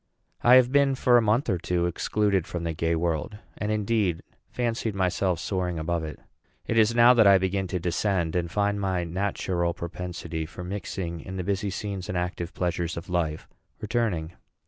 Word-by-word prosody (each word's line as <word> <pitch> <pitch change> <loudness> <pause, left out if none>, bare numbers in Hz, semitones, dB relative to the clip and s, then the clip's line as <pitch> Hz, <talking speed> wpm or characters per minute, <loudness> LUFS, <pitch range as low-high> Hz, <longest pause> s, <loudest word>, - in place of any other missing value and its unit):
I 120 +1 +7
have 130 -1 +5
been, 140 -1 +4
for 125 -1 +3
a 120 - +7
month 115 +5 +2
or 95 -6 0
two, 90 0 0
excluded 95 +1 0
from 85 -1 -4
the 85 -1 -2
gay 80 +1 0
world, 85 +4 -2 0.2
and, 105 0 -1
indeed, 105 -5 0 0.3
fancied 115 -3 -2
myself 95 -1 0
soaring 90 -4 -2
above 80 +1 -1
it. 75 -1 -6 0.5
It 115 - +1
is 110 +1 +4
now 120 +1 +7
that 115 -4 +5
I 100 -1 +8
begin 95 +1 -1
to 90 +1 -2
descend, 90 -1 0
and 85 -1 0
find 100 +2 0
my 95 -2 0
natural 85 -1 -1
propensity 85 -1 -5
for 90 +2 -9
mixing 90 -2 -4
in 95 +4 -7
the 90 - -2
busy 100 +2 -1
scenes 95 -1 -5
and 90 - -1
active 90 0 -3
pleasures 85 -2 -2
of 85 +2 -7
life 80 -3 -1 0.3
returning. 100 -8 -1
95 Hz, 185 wpm, -26 LUFS, 85-105 Hz, 0.5 s, I